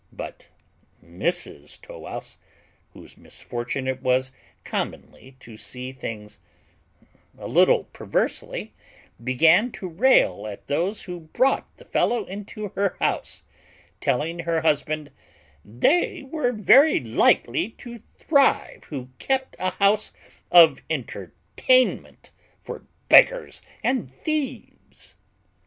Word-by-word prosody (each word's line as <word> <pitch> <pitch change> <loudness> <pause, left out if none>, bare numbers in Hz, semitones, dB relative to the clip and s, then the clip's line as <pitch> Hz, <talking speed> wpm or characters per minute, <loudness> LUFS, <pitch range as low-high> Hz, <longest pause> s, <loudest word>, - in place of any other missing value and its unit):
But - - -9 0.6
Mrs 80 -4 -4
Tow - - -12
wouse, - - -8 0.6
whose - - -14
misfortune 120 +2 -5
it 130 0 -2
was 130 0 +1 0.3
commonly 130 0 -6
to 115 -2 -13
see 125 +5 -6
things 105 -5 -8 1.0
a - - -7
little - - +4
perversely, - - -3 0.5
began 165 - +4
to 190 - -6
rail 165 - +3
at 100 -2 -9
those 180 +8 -1
who 180 -2 -7 0.2
brought 270 +1 +2
the - - -16
fellow 235 -4 0
into 205 +2 -7
her 200 0 -1
house; - - -2 0.6
telling 160 +7 -1
her 165 -1 -1
husband, 155 -1 0 0.5
"They 285 - +1
were 270 -2 -1
very 265 +7 +5
likely 120 - +2 0.2
to 235 -2 -9 0.2
thrive 280 -3 +2
who 130 -4 -7
kept 265 -1 -1
a 185 - 0
house 205 +2 +1 0.4
of 165 -5 +7
entertainment 155 - -1 0.3
for - - -9 0.2
beggars - - +5 0.2
and 245 - -1
thieves." 300 - -5
165 Hz, 110 wpm, -24 LUFS, -, 1.0 s, of